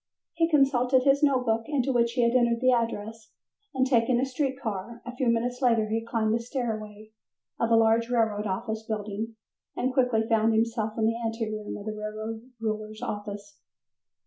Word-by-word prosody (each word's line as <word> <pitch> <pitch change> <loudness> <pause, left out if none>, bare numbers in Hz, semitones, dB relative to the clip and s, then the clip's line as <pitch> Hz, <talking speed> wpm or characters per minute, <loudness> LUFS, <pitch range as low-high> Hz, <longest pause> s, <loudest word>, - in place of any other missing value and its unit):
He 330 0 +1
consulted 260 -4 +3
his 275 +1 +4
notebook 250 -6 +2
into 275 -3 0
which 235 -1 +2
he 245 - +2
had 235 +1 +2
entered 235 -2 +3
the 255 +1 +4
address, 225 -2 -2 0.4
and 260 -2 +1
taking 240 -1 +3
a 260 - +2
street 265 0 -2
car, 220 0 -5
a 250 0 -7
few 250 0 -1
minutes 240 +2 0
later 230 -4 +3
he 225 +1 -1
climbed 225 -2 0
the 230 - +1
stairway 220 -4 -5 0.5
of 230 - +1
a 230 - +5
large 225 +1 +3
railroad 220 -3 +1
office 220 +3 -3
building 220 0 -4 0.4
and 255 +1 -1
quickly 250 -4 +2
found 225 0 +3
himself 225 -1 0
in 220 - +2
the 230 +1 +1
ante 225 -1 -2
room 215 -1 -5
of 205 - -9
the 215 - -3
railroad 215 +3 -6
ruler's 215 0 -4
office. 205 -2 -6
230 Hz, 180 wpm, -27 LUFS, 215-250 Hz, 0.5 s, a